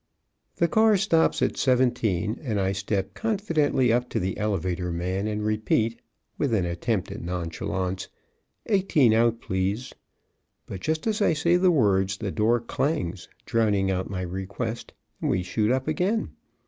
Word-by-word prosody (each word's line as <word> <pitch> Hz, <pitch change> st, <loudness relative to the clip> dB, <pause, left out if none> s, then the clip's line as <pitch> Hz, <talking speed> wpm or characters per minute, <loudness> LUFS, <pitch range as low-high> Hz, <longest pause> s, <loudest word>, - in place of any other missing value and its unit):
'"] -, -, -50 dB
The 170 Hz, -, +2 dB
car 220 Hz, +2 st, +4 dB
stops 170 Hz, -5 st, +2 dB
at -, -, 0 dB
seventeen, 120 Hz, -6 st, +1 dB
and 110 Hz, -8 st, -2 dB
I 95 Hz, 0 st, +1 dB
step 100 Hz, 0 st, -2 dB
confidentially 165 Hz, -, +1 dB
up 125 Hz, +1 st, 0 dB
to -, -, -1 dB
the 95 Hz, +1 st, -2 dB
elevator 90 Hz, -4 st, -1 dB
man 90 Hz, +4 st, -2 dB
and 105 Hz, 0 st, -2 dB
repeat, 110 Hz, +2 st, 0 dB, 0.4 s
with 135 Hz, -6 st, +1 dB
an 95 Hz, -4 st, +1 dB
attempt 90 Hz, +3 st, -2 dB
at -, -, -6 dB
nonchalance, 90 Hz, +2 st, -3 dB, 0.6 s
"Eighteen 185 Hz, -, +3 dB
out, 115 Hz, 0 st, +3 dB
please." 95 Hz, +6 st, -2 dB, 0.7 s
But 95 Hz, -, -7 dB
just 160 Hz, +6 st, -1 dB
as 220 Hz, -1 st, 0 dB
I 185 Hz, -, +4 dB
say 170 Hz, +3 st, +2 dB
the 180 Hz, +1 st, +4 dB
words 95 Hz, -, +2 dB
the 100 Hz, -2 st, -3 dB
door 115 Hz, +4 st, +2 dB
clangs, 115 Hz, -, -2 dB, 0.2 s
drowning 105 Hz, -4 st, +1 dB
out 95 Hz, 0 st, -2 dB
my 95 Hz, -1 st, -3 dB
request, 95 Hz, +6 st, -5 dB, 0.3 s
and -, -, 0 dB
we 90 Hz, -, +1 dB
shoot 105 Hz, +4 st, 0 dB
up 130 Hz, +2 st, 0 dB
again. 185 Hz, +8 st, 0 dB
110 Hz, 160 wpm, -26 LUFS, 95-145 Hz, 0.7 s, car